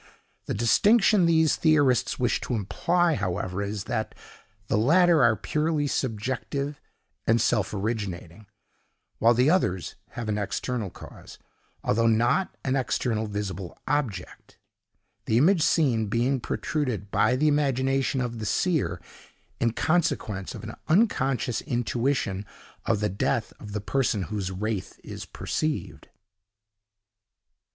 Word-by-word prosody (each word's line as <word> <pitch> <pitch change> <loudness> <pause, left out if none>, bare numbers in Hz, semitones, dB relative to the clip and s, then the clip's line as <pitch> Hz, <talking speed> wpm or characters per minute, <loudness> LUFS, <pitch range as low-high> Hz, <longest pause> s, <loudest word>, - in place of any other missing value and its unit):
The - - -2
distinction 195 - +4
these 160 -2 +4
theorists 145 -7 +2
wish 125 -1 0
to 125 - -2
imply, 170 - +1
however, 95 -2 -2
is 100 0 -3
that 110 -2 -3 0.5
the - - 0
latter 165 - +4
are 115 -2 +5
purely 150 +6 -1
subjective 130 +3 -3 0.5
and 115 +1 +4
self 105 -3 +1
originating, 100 -3 -4 0.7
while 115 +2 +5
the 125 +6 +4
others 95 - 0 0.2
have 120 -2 -5
an 105 -1 -1
external 110 +1 -3
cause, - - -12 0.5
although 115 +2 +2
not 120 +11 +2
an 135 0 0
external 120 -4 -1
visible 100 -4 -5
object—the 115 -3 -5
image 165 +7 +4
seen 125 -10 +2
being 120 +5 +1
protruded 125 -7 -3
by 125 - +3
the 150 +4 +2
imagination 135 -2 +1
of 120 -2 -3
the 110 - -4
seer, 105 - 0 0.6
in 115 - +2
consequence 125 - -1
of 110 - -9
an 110 0 -6
unconscious 135 - +1
intuition 120 -5 -1 0.4
of 105 -2 +1
the 105 - +1
death 110 +4 -1
of 105 -1 -9
the 105 - -2
person 110 -3 0
whose 100 -2 -3
wraith 100 +1 -4
is - - -7
perceived. 155 -1 -3
120 Hz, 125 wpm, -26 LUFS, 105-145 Hz, 0.7 s, are